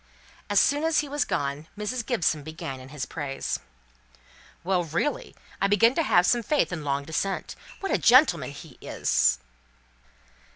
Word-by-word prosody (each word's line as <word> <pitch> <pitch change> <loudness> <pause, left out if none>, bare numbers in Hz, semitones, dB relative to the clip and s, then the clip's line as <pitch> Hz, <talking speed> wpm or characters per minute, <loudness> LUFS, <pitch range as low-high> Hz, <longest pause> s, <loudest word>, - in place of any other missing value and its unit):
As 205 -1 +4
soon 290 +7 +2
as 325 -1 +3
he 295 - -7
was 290 +1 -1
gone, 140 +2 -3
Mrs. 230 +4 -3
Gibson 195 - 0
began 145 -3 -7
in 130 +1 -12
his 145 -1 -5
praise. 140 -3 -4 1.0
"Well, 180 0 +1
really, 295 - -2 0.3
I 195 - +4
begin 225 +4 +4
to 330 - +1
have 175 - +4
some 240 +4 +3
faith 285 -4 0
in 160 -3 -4
long 140 0 -1
descent. 190 +5 -3 0.3
What 390 - -2
a - - +2
gentleman 240 - +5
he 145 0 -12
is! - - +1
180 Hz, 160 wpm, -26 LUFS, -, 1.0 s, gentleman